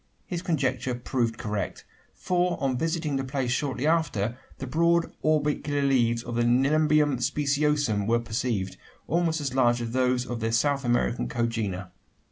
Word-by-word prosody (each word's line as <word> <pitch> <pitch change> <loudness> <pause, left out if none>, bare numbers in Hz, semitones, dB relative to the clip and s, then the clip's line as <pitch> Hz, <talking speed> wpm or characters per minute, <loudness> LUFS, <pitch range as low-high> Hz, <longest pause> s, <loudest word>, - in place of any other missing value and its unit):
His 175 -2 -4
conjecture 130 -7 -1
proved 120 -2 -1
correct: 105 -2 -4 0.3
for 180 0 0
on 135 -2 0
visiting 160 0 -1
the 135 - -2
place 130 -2 -2
shortly 135 0 -1
after, 135 -9 +1 0.2
the 135 - -5
broad 170 +5 +2
orbicular 150 -2 +1
leaves 120 -4 +2
of 120 - -6
the 120 - +1
Nelumbium 145 +3 +3
speciosum 145 -6 +1
were 115 +1 +3
perceived 110 -5 -2 0.3
almost 165 0 +1
as 135 -3 -3
large 120 -2 +3
as 115 -1 -4
those 125 0 +1
of 120 -2 -4
their 115 0 -1
South 140 +4 +1
American 120 0 +1
congener. 110 -6 -2
130 Hz, 150 wpm, -26 LUFS, 120-150 Hz, 0.3 s, Nelumbium